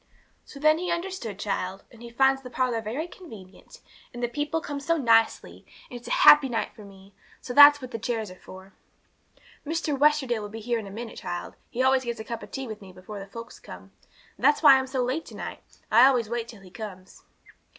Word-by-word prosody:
'So 280 - -12
then 310 +2 +4
he 355 0 -3
understood, 340 - -4
child; 195 -2 -4
and 235 -2 -17
he 235 - -9
finds 270 +3 +2
the 255 - -10
parlour 250 -2 -1
very 245 +10 -4
convenient, 220 - -14 0.3
and 240 0 -8
the - - +2
people 295 +6 -2
come 290 -3 -6
so 330 +4 0
nicely, 230 -5 +1 0.3
and 245 - -7
it's 240 - -14
a - - -6
happy 295 -3 +8
night 230 -2 -2
for 215 - -12
me. 195 0 -16 0.3
So 250 - -7
that's 290 +1 +8
what 255 - -8
the 230 - -5
chairs 225 -3 -3
are - - -11
for. 190 +1 -13 0.9
'Mr. 315 -1 -2
Westerdale 275 -5 +2
will 205 - -7
be 225 +2 -8
here 235 +1 -2
in 210 - -8
a - - -8
minute, 225 +3 -8
child; 175 0 -6 0.2
he 255 - -1
always 265 0 +3
gets 235 -2 -4
a - - -5
cup 230 0 -6
of - - -11
tea 270 - -5
with 215 -3 -8
me 190 -2 -12
before 185 +3 -10
the 195 - -9
folks 230 +3 -10
come. - - -12 0.5
That's 295 - +3
why 270 -3 +8
I'm 265 - -4
so 260 -1 -1
late 260 +6 -3
to - - -11
night; - - -7 0.3
I 235 +4 +7
always 240 -5 +1
wait 235 -1 -3
till 225 -4 -13
he 185 - -15
comes.' 190 -3 -10
240 Hz, 225 wpm, -26 LUFS, 215-275 Hz, 0.9 s, happy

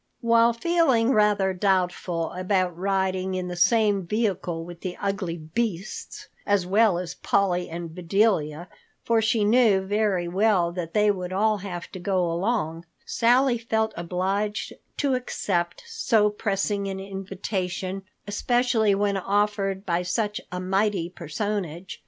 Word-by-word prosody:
While 230 0 +4
feeling 265 -3 +2
rather 210 -4 +3
doubtful 180 -3 0
about 185 -1 0
riding 190 0 -1
in 180 -1 -3
the 180 - -4
same 205 +2 +3
vehicle 180 -4 -1
with 175 -1 -10
the 185 -2 -5
ugly 195 -4 -2
beasts 185 +4 -4 0.2
as 205 -3 +1
well 200 0 +3
as 175 -1 -4
Polly 180 -3 0
and 165 0 -6
Bedelia—for 180 +3 0
she 220 0 +2
knew 215 -3 +4
very 195 -2 0
well 185 -1 +2
that 170 0 -6
they 210 0 +4
would 180 -2 -5
all 210 +2 +2
have 180 -3 -6
to 185 - -7
go 180 -2 0
along—Sally 230 - 0
felt 220 -1 0
obliged 190 +5 -2 0.2
to 280 -2 +1
accept 185 -8 -2
so 210 -3 +2
pressing 200 -1 -1
an 190 0 -4
invitation, 190 -1 -4 0.2
especially 225 0 +2
when 200 0 +1
offered 200 0 0
by 175 -1 0
such 205 +4 -1
a 180 - -3
mighty 190 -1 0
personage. 180 0 -4
195 Hz, 130 wpm, -25 LUFS, 180-215 Hz, 0.2 s, While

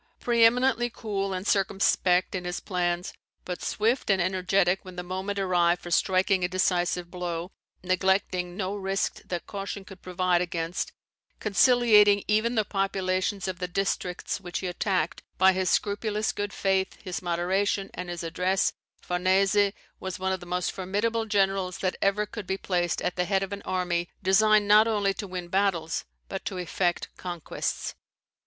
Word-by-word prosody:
Pre 235 -1 +3
eminently 245 +1 +4
cool 200 -4 -3
and 185 0 -3
circumspect 190 -2 +2
in 185 -2 -3
his 180 0 -3
plans, 175 -1 -2 0.3
but 180 -1 -5
swift 230 +4 0
and 195 -1 +4
energetic 185 +1 +1
when 185 -1 -10
the 180 - -4
moment 190 +3 -4
arrived 180 -2 +2
for 175 - -7
striking 185 +1 +2
a - - +3
decisive 180 -1 0
blow, 175 0 -4 0.3
neglecting 185 -1 0
no 195 0 -2
risk 195 0 -2
that 175 -1 -4
caution 200 0 -6
could 190 -1 -13
provide 180 -1 +1
against, 170 -1 -2 0.5
conciliating 210 -2 +5
even 215 +3 +2
the 215 -2 +2
populations 195 0 -1
of 185 -1 -4
the 180 - -2
districts 180 0 -2
which 175 -1 -4
he - - -5
attacked 180 -2 -1 0.2
by 190 0 +6
his 185 -1 0
scrupulous 210 +1 0
good 205 0 -3
faith, 190 -1 0
his 180 -1 -4
moderation, 185 +3 0
and 180 -1 -6
his 175 -1 -5
address, 180 +3 +1 0.3
Farnese 195 +3 +2 0.3
was 190 -1 -5
one 190 0 -1
of 190 - -1
the 175 - -11
most 180 0 -1
formidable 210 +4 -1
generals 195 -3 +1
that 185 -1 -1
ever 200 +2 +2
could 210 -2 -8
be 190 - -1
placed 175 -3 -1
at 180 - -2
the 180 - +1
head 195 +1 +1
of 195 +1 -5
an 200 - -6
army 175 -2 -1
designed 210 +2 +4
not 210 +2 +7
only 205 -3 +1
to 200 +1 -6
win 180 -1 -5
battles, 175 -3 0 0.2
but 195 - -5
to 190 - -3
effect 175 0 -1
conquests. 175 -3 -4
190 Hz, 165 wpm, -27 LUFS, 180-200 Hz, 0.5 s, not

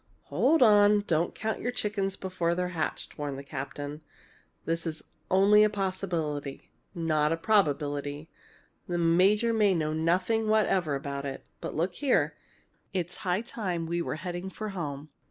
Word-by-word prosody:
"Hold 305 0 +4
on! 205 -2 +6
Don't 170 -1 0
count 220 0 -3
your 245 - -1
chickens 205 -5 -2
before 180 -2 -1
they're 180 0 -1
hatched!" 165 -2 -4
warned 145 -2 -3
the 140 - -7
captain. 145 +2 -6 0.6
"This 165 +1 -1
is 155 -1 -5 0.3
only 200 +3 +6
a 215 - +4
possibility 175 -8 -3 0.2
not 155 -3 +1
a 165 - +1
probability. 145 -6 0 0.6
The 175 - -1
major 190 +7 +3
may 210 -4 +3
know 155 -2 0
nothing 180 +8 +1
whatever 190 -8 +2
about 140 0 -4
it. 135 - -7
But - - -5
look 175 +4 0
here! 270 +8 +1 0.6
it's 180 -1 -2
high 180 +2 0
time 190 -8 -3
we 170 +1 -1
were - - -3
heading 175 +3 -5
for 215 +3 -5
home. 150 -6 -5
175 Hz, 155 wpm, -28 LUFS, 155-205 Hz, 0.6 s, on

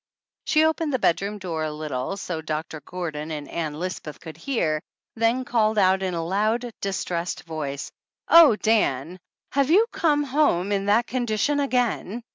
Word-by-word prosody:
She 310 0 +4
opened 315 -1 0
the 260 - +1
bedroom 200 0 0
door 170 -5 -3
a 155 - -2
little, 150 +3 -4
so 175 -5 -4
Doc 155 0 -3
tor 155 - -7
Gordon 160 -4 -5
and 150 -2 -5
Ann 155 -3 -3
Lisbeth 180 -4 -5
could 160 - -9
hear, 165 - -1 0.3
then 230 +3 +1
called 220 -3 +1
out 190 -1 +4
in 185 -2 -2
a 165 -1 -2
loud, 215 +6 0
distressed 180 -3 -3
voice: 150 -4 -5 0.4
"Oh, 330 -9 +8
Dan! 185 - 0 0.3
Have 275 0 +1
you 400 +8 +6
come 300 -5 +2
home 260 - +1
in 200 -1 0
that 220 +4 +4
con 250 -1 -2
dition 285 +7 +1
again?" 245 -4 -1
195 Hz, 170 wpm, -24 LUFS, 160-245 Hz, 0.4 s, Oh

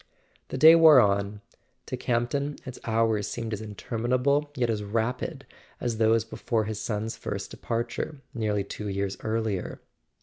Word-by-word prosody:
The - - -5
day 160 +5 +9
wore 160 -4 +8
on. 100 -1 +1 0.4
To - - -4
Campton 125 +5 -1
its 130 - -8
hours 110 -2 +1
seemed 115 -2 -4
as 105 - -4
interminable 125 +7 0
yet 120 -3 +1
as 105 -2 -2
rapid 120 +7 -2 0.3
as 115 -3 -2
those 110 0 +3
before 115 -1 -1
his 105 -1 -4
son's 110 0 -3
first 100 0 -5
departure, 120 +5 -3
nearly 105 -5 0
two 105 +1 -6
years 100 0 -2
earlier. 110 -4 -2
115 Hz, 145 wpm, -27 LUFS, 105-125 Hz, 0.4 s, day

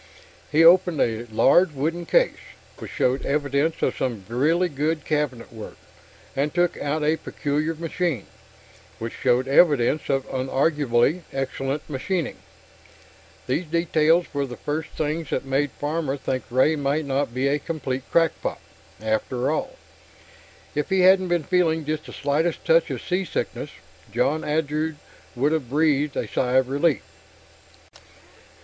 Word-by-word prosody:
He 155 +2 +5
opened 175 -1 +6
a 115 0 0
large 145 +9 +4
wooden 165 +5 -2
case, - - +2 0.4
which - - -7
showed 130 +2 0
evidence 145 +2 0
of - - +1
some 115 -7 -3
really 155 +10 +2
good 155 +1 -2
cabinet 145 -7 -2
work, 110 -1 -9 0.6
and 145 +2 0
took 175 +1 +1
out 150 +2 -1
a 155 +2 +2
peculiar 150 +2 -2
machine, 165 - -2 0.7
which 115 0 -5
showed 125 0 +1
evidence 145 -1 +3
of 135 -1 0
unarguably 135 +2 +1
excellent 135 +2 -3
machining. 160 +4 -2 1.1
These 150 +8 -1
details 165 +1 +2
were 140 -1 -1
the 125 - -8
first 150 +1 -3
things 155 +1 -3
that 135 - -2
made 135 +2 +1
Farmer 145 -2 -2
think 130 -1 -3
Ray 130 +6 +3
might 145 +1 -1
not 140 -1 -1
be 130 +3 0
a 145 +2 +1
complete 135 -4 -3
crackpot, 165 -2 +1 0.4
after 110 +5 -1
all. 155 - -2 1.0
If 150 +4 -2
he 190 -1 +3
hadn't 185 0 +5
been 175 -2 +1
feeling 160 -2 +1
just 155 0 -3
the - - -9
slightest 155 +4 -1
touch 165 0 +4
of 130 -4 -4
seasickness, 180 0 -2 0.4
John 130 +7 +1
Andrew 155 +1 -1 0.4
would 140 +5 +1
have 155 -7 -1
breathed 150 0 +1
a - - -1
sigh 125 -1 -1
of 130 -1 +3
relief. 145 - +1
150 Hz, 140 wpm, -24 LUFS, 135-160 Hz, 1.1 s, opened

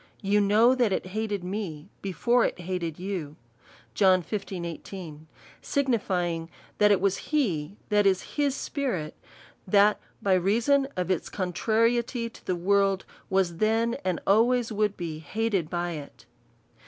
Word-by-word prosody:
You 205 +1 +3
know 215 +5 +5
that 245 -5 +2
it 185 - -1
hated 210 -3 -2
me 185 -3 -5
he 195 - -3
fore 240 +8 +2
it - - -1
hated 175 -3 -3
2/ou: 180 -6 -4 2.3
signifying, 180 -11 -1 0.3
that 210 0 +6
it 200 - +4
was 200 0 +1
he, 200 - -1
that 205 -1 +4
is, 190 -1 +2
his 285 -2 +1
spirit, 220 - -3 0.5
that 205 +2 +4 0.2
by 195 - +2
reason 235 +10 +3
of 180 0 0
its 185 - -1
contrariety 230 +5 0
to - - -16
the 185 - +1
world, 195 +2 +2 0.2
was 190 -3 +1
then, 225 +3 +2
and 185 -3 -1
always 235 +3 +3
would 210 -1 0
be 165 -3 -5
hated 195 +1 -1
by 175 0 -2
it. 150 -4 -9
200 Hz, 135 wpm, -27 LUFS, 180-225 Hz, 2.3 s, that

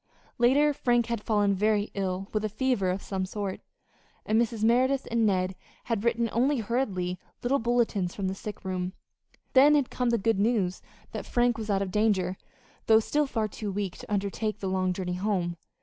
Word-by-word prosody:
Later 285 +5 +4
Frank 240 -3 +2
had 235 -2 -3
fallen 205 -3 +2
very 210 +1 +1
ill 190 -1 -2
with 215 -1 0
a 215 - 0
fever 215 -3 0
of 185 +2 -2
some 190 -1 -2
sort, 195 0 -4 0.6
and 220 +2 +3
Mrs. 230 -2 -2
Merideth 255 +4 +3
and 230 -1 +3
Ned 185 -1 +1 0.3
had 225 -3 -2
written 235 0 +1
only 265 +5 +2
hurried 200 -6 -1 0.2
little 270 +3 +2
bulletins 230 -6 0
from 195 -2 -2
the 190 - -1
sick 205 +1 -8
room. 185 -1 -2 0.6
Then 285 +3 +7
had 285 -4 +1
come 250 -1 0
the 235 - +3
good 225 -1 +1
news 205 -4 +1 0.3
that - - -6
Frank 240 -1 +2
was 220 -1 -6
out 200 -1 +2
of 190 - -5
danger, 195 -3 +1 0.5
though 220 -1 +7
still 295 +6 0
far 220 -4 -1
too 210 0 -5
weak 195 -2 -3
to - - -11
undertake 205 +1 -1
the - - -5
long 185 -1 +1
journey 180 -1 -3
home. 180 -2 -1
215 Hz, 190 wpm, -28 LUFS, 190-235 Hz, 0.6 s, Then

